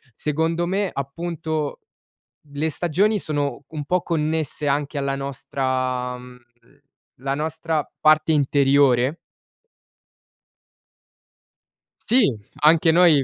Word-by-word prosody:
Secondo 160 +5 0
me, 195 +2 0
appunto, 155 +1 -4 0.7
le 150 +3 -1
stagioni 180 +7 +1
sono 145 -4 -2
un 150 -3 -6
po' 180 +3 +1
connesse 155 -2 -1
anche 145 +1 -1
alla 140 -1 -1
nostra 130 -2 -2
mhmm, 125 0 -13 0.8
la 135 0 -1
nostra 155 0 -2
parte 155 +1 +4
interiore. 140 -1 +3 2.9
Sì, 245 -1 +5 0.4
anche 160 +1 +5
noi 165 -4 +5
150 Hz, 90 wpm, -22 LUFS, 140-165 Hz, 2.9 s, Sì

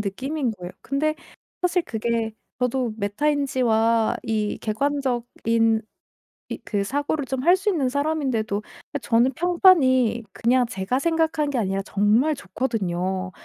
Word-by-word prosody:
느낌인 255 +7 -2
거예요. 180 -3 -8
근데 305 +3 0 0.5
사실 360 0 +2
그게 230 -3 -2 0.3
저도 250 -2 0
메타인지와 230 -1 +1
이 215 -2 -1
객관적인 230 -3 0 0.7
이 - - -4
그 205 -2 -1
사고를 285 +5 -1
좀 265 0 -3
할 350 +3 +6
수 385 +2 -1
있는 305 -10 +1
사람인데도 265 -8 -1 0.3
아 285 - -1
저는 240 +2 +2
평판이 265 - +4
그냥 245 +1 +2
제가 195 +6 -2
생각한 320 -2 +1
게 275 - -2
아니라 195 -3 0
정말 220 +11 +2
좋거든요. 190 -8 -2
250 Hz, 275 characters per minute, -23 LUFS, 220-285 Hz, 0.7 s, 할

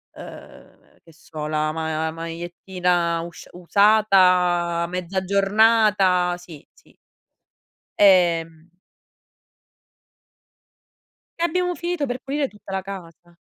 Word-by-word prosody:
ehm - - -14 0.2
che 165 - -19
so, 155 -1 -8
la 155 0 -1
ma 160 0 -3
magliettina 170 +1 -2
usc 170 0 -10
usata 180 -3 +3
mezza 180 +1 -3
giornata, 200 -2 +2
sì, 175 -4 -14
sì. - - -25 1.0
Ehm 170 -4 +3 2.7
E - - +1
abbiamo 360 +1 -1
finito 345 -3 -3
per 250 -1 -4
pulire 280 0 -2
tutta 205 -2 -12
la 190 - -2
casa. 175 -3 -11
180 Hz, 95 wpm, -22 LUFS, 165-200 Hz, 2.7 s, usata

